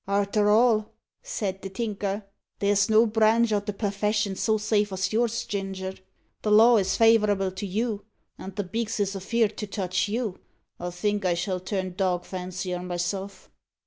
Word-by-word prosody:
"Arter 205 +1 +2
all," 215 0 +4 0.3
said 205 - -3
the 195 - -5
Tinker, 205 -1 -3 0.3
"there's 200 0 +2
no 220 +1 +6
branch 220 +1 +3
o' 205 - +3
the 205 +1 -4
perfession 205 0 -1
so 220 +3 +1
safe 210 -1 +1
as 190 +1 -2
yours, 235 0 0
Ginger. 190 -1 -4 0.5
The 215 - -1
law 225 +3 +7
is 190 -2 +1
favourable 210 -4 +4
to 190 +2 -5
you, 210 +1 -2 0.3
and 190 0 -9
the 205 - -1
beaks 225 +3 -3
is 200 -1 0
afeerd 215 +3 0
to 210 - -4
touch 190 0 -1
you. 215 -2 -2 0.4
I 175 - -3
think 205 +4 -1
I 180 -2 +2
shall 180 +1 -2
turn 185 0 -3
dog 180 -2 0
fancier 180 -1 -4
myself." 180 +2 -4
205 Hz, 165 wpm, -26 LUFS, 190-215 Hz, 0.5 s, law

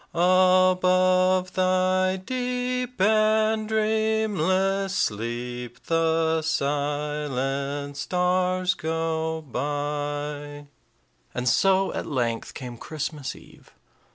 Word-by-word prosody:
Above 185 +1 +4
thy 185 0 +2
deep 250 +3 -3
and 215 +1 +3
dreamless 210 -3 +1
sleep 120 - -3
The 160 -1 +1
silent 145 -2 -2
stars 180 +3 +1
go 160 -1 -2
by." 145 +1 -4 0.7
And 125 +1 -2
so 190 +8 +3
at - - -4
length 120 -5 -2
came 125 -2 -7
Christmas 150 -2 -5
eve. - - -18
170 Hz, 75 wpm, -25 LUFS, 145-190 Hz, 0.7 s, Above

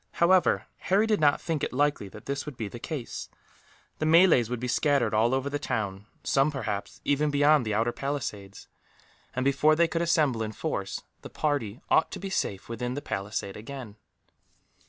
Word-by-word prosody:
However, 180 +1 +3
Harry 200 +4 +2
did 215 -1 +1
not 145 -1 +4
think 160 -4 -2
it - - -1
likely 145 -6 0
that 105 - -12
this 140 +1 -3
would 145 -5 -7
be 110 -3 -3
the 120 - -8
case. 145 -2 -5 0.7
The 155 - 0
Malays 160 - +6
would 125 -1 -3
be 125 - -3
scattered 130 -3 +2
all 110 +3 +3
over 135 +1 0
the 145 +1 -2
town 105 -7 -3 0.2
some, 135 +2 +3
perhaps, 110 -8 -4
even 145 +1 +2
beyond 145 -3 +4
the 105 - 0
outer 115 +2 +1
palisades 105 -9 -5 0.7
and 125 +1 -1
before 140 +3 +4
they 170 +1 +4
could 165 0 -2
assemble 155 -8 +2
in 110 0 -3
force, - - -3 0.2
the - - -9
party 135 -7 -2
ought - - +4
to - - -5
be 195 +1 -5
safe 100 - -2
within 120 +2 -3
the 145 - -3
palisade 100 0 -4
again. 115 -1 -8
135 Hz, 185 wpm, -27 LUFS, 110-150 Hz, 0.7 s, Malays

